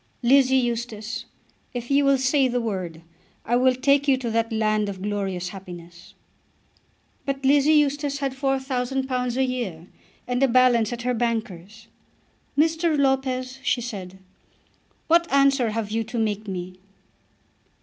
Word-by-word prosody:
Lizzie 265 +1 +5
Eustace, 235 -1 -3 0.5
if 240 +2 -5
you 280 +1 +4
will 275 0 +4
say 265 +1 +2
the 245 0 -1
word, 185 -8 -4 0.4
I 240 - +1
will 255 +1 +3
take 280 +2 +2
you 270 -2 +4
to 240 -3 -4
that 230 +1 0
land 215 -1 +1
of 195 -2 -6
glorious 195 -3 -2
happiness." 175 -2 -11 1.1
But 275 -1 -3
Lizzie 290 +3 +4
Eustace 290 -1 +1
had 275 -2 -2
£4000 265 -2 -1
a 265 - +3
year 235 -11 -3 0.4
and 245 +1 -1
a 270 - +5
balance 245 -3 +3
at 240 -1 -5
her 250 0 0
banker's. 220 -3 -3 0.7
"Mr. 320 +1 +2
Lopez," 265 -1 0
she 265 - +1
said. 190 -6 -7 0.9
"What 335 +1 +3
answer 275 -3 +3
have 215 -1 -3
you 225 +1 0
to 235 - -6
make 215 -1 -1
me?" 185 -1 -6
245 Hz, 140 wpm, -24 LUFS, 215-270 Hz, 1.1 s, Lizzie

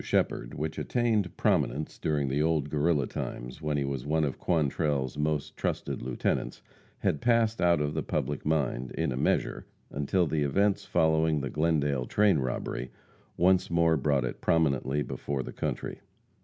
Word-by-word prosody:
Shepherd, - - 0
which 80 +1 -3
attained 115 -6 0
prominence 75 +2 0
during 75 -3 0
the 70 +3 0
old 75 -2 +1
Guerrilla 75 -2 +2
times, 60 +5 -6
when 75 -1 -1
he 70 - +1
was 70 -2 -3
one 80 +2 +1
of 70 -4 -2
Quantrell's 75 -5 0
most 75 -1 -1
trusted - - -2
lieutenants, 60 0 -2 0.3
had 75 - 0
passed 115 -3 +2
out 85 -2 +4
of 75 0 -1
the 80 - -1
public 75 -1 -2
mind, 70 -5 -1
in 80 -4 -1
a - - -2
measure, 65 - 0 0.2
until 75 +6 +1
the 75 0 -1
events 100 +8 +1
following 80 -1 +2
the 70 - -4
Glendale 75 -5 +1
train 100 -6 +3
robbery 65 -1 -3 0.5
once 90 +1 +3
more 85 -1 +3
brought 70 -3 +1
it 60 - -5
prominently 75 -3 +1
before 70 -2 -3
the - - -8
country. - - -4
75 Hz, 160 wpm, -29 LUFS, 70-80 Hz, 0.5 s, out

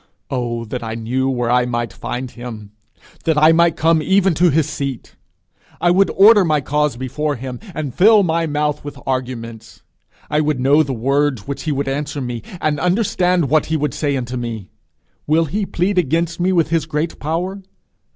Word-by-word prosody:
'Oh 120 -3 -2
that 125 +3 -5
I 115 -1 -5
knew 125 +4 -1
where 120 -2 -1
I 125 0 +3
might 120 -1 -3
find 125 0 -5
him! 115 -4 -9 0.5
that 160 -2 +1
I 155 +2 +6
might 170 0 +3
come 160 0 +3
even 190 +2 +3
to 175 +3 +3
his 155 0 +2
seat! 135 -4 -5 0.6
I 175 - +3
would 195 +2 +3
order 205 +1 +7
my 155 -3 +2
cause 150 -1 0
before 140 +4 -2
him, 125 0 -7 0.2
and 145 -5 -4
fill 210 - +5
my 165 -1 0
mouth 150 0 -1
with 145 -1 -8
arguments. 120 -4 -5 0.4
I 150 +1 +1
would 150 -3 0
know 140 +4 +4
the 145 - -2
words 135 -1 0
which 140 - -4
he 155 - 0
would 140 0 -2
answer 145 +1 -3
me, 120 -3 -4 0.2
and 150 -1 0
understand 180 -3 +1
what 155 +3 +2
he 160 - 0
would 150 0 -1
say 145 -3 -1
unto 125 0 -4
me. 115 -5 -5 0.6
Will 160 +2 +3
he 195 +6 -2
plead 185 +2 0
against 165 +2 0
me 180 +2 +2
with 170 -3 +2
his 165 -2 0
great 155 +1 -3
power? 175 +7 -3
150 Hz, 190 wpm, -19 LUFS, 125-165 Hz, 0.6 s, order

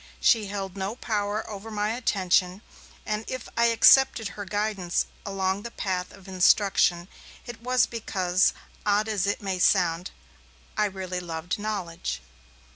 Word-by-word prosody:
She 220 -3 +3
held 195 -1 -5
no 195 +3 -3
power 210 -3 -2
over 210 +1 -7
my 210 0 -1
attention, 190 -5 +1 0.4
and 210 +1 -2
if 255 -2 -5
I 235 - +3
accepted 230 0 +5
her 205 0 -7
guidance 205 -3 -1 0.2
along 195 0 -1
the 235 - -6
path 185 -5 -3
of 195 -1 -15
instruction, 185 -2 +3 0.4
it 240 -1 -9
was 250 +1 +3
because, 185 -5 +1 0.3
odd 210 +1 +2
as 200 -3 0
it 205 - -1
may 190 -2 -2
sound, 180 -2 +2 0.7
I 210 - +2
really 190 -2 -4
loved 175 +3 -4
knowledge. 195 - -3
200 Hz, 140 wpm, -26 LUFS, 185-215 Hz, 0.7 s, accepted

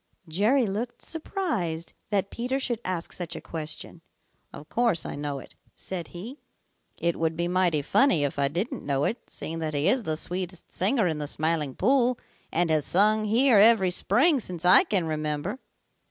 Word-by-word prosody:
Jerry 215 - +2
looked 220 +4 -4
surprised 270 - -3 0.2
that 200 -1 0
Peter 250 +3 -2
should 240 -4 -2
ask 180 -2 -4
such 175 -2 -6
a - - -5
question. 160 +1 -5 0.5
"Of 150 - -11
course 235 -8 +1
I - - -5
know 145 -1 -4
it," 135 - -11 0.2
said 180 -3 -6
he. 225 +11 -9 0.6
"It 170 0 -1
would 160 0 0
be 170 0 0
mighty 175 -4 +1
funny 265 - +3
if 145 0 -2
I 140 - +3
didn't 200 - -3
know 140 -1 0
it, 235 - -3
seeing 165 +1 -6
that 155 -2 -3
he 145 +2 +1
is 255 - +3
the 155 -7 -2
sweetest 180 +1 -6
singer 210 +3 +1
in 160 -3 -2
the 150 - -4
Smiling 155 -2 -1
Pool 250 +2 +2 0.3
and 170 0 +2
has 155 -2 +2
sung 215 +7 +3
here 230 +1 +4
every 205 -4 +6
spring 280 - +4
since 180 -6 -6
I 180 +1 +8
can 190 -5 +1
remember." 155 - -3
180 Hz, 180 wpm, -26 LUFS, 160-230 Hz, 0.6 s, I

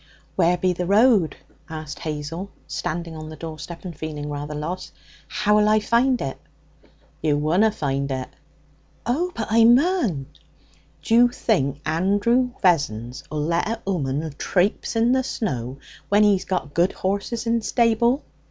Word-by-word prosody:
'Where 175 -1 +3
be 180 +1 +1
the 180 0 -3
road?' 205 - +4 0.3
asked 155 -2 -6
Hazel, 155 +5 -4 0.2
standing 165 0 -4
on 155 0 -7
the 155 - -8
door 155 0 -7
step 170 +5 -8
and 175 -3 -6
feeling 150 -1 -5
rather 145 +1 -5
lost. 170 +5 -5 0.3
'How'll 210 0 +3
I 215 0 +5
find 240 +4 +2
it?' 135 - -4 0.8
'You 150 -2 +2
wunna 170 +9 +3
find 140 -8 -2
it.' 130 -1 -4 0.7
'Oh, 325 +10 0
but 225 - -2
I 230 +1 +6
mun!' 240 - +3 0.8
'D'you 240 +2 +5
think 145 - 0
Andrew 205 +10 +2
Vessons'll 130 - 0
let 170 +4 0
an 230 - -1
'ooman 155 -4 -1
trapse 190 +4 0
in 230 +2 +3
the 260 0 +2
snow 130 - -3 0.3
when 205 +1 +5
he's 200 -2 +3
got 165 -6 -2
good 175 +3 +2
horses 200 +5 -2
in 230 0 +1
stable?' 235 +4 +2
180 Hz, 145 wpm, -23 LUFS, 150-225 Hz, 0.8 s, I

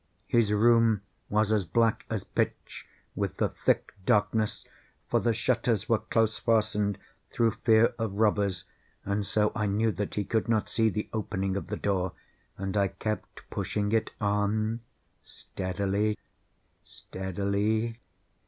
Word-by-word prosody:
His 115 -3 +2
room 115 -1 +4 0.3
was 105 +1 +2
as 105 -2 +3
black 115 +6 +1
as - - -2
pitch - - -3 0.3
with - - -2
the - - +1
thick - - 0
darkness, 105 +2 +1 0.4
(for - - +2
the 120 - +2
shutters 115 -2 0
were 115 -2 +3
close 110 -1 +1
fastened, 105 -3 +1 0.3
through 115 -1 +2
fear 115 0 +5
of 110 -3 -1
robbers,) 100 -3 +1 0.4
and 100 0 -1
so 105 -1 +2
I 110 -1 -1
knew 110 +3 +2
that 105 +1 -4
he 105 - 0
could 110 +3 0
not 110 -2 +1
see 110 -1 +2
the 105 +1 -3
opening 95 -3 -2
of 95 -4 -3
the 105 +2 -3
door, 95 -2 0 0.4
and 95 +1 -3
I 100 -1 +3
kept 110 +3 -5
pushing 105 -1 -1
it 110 -1 +1
on 105 +2 0 0.4
steadily, 100 +3 -2 0.7
steadily. 100 +5 -2
105 Hz, 140 wpm, -28 LUFS, 100-110 Hz, 0.7 s, fear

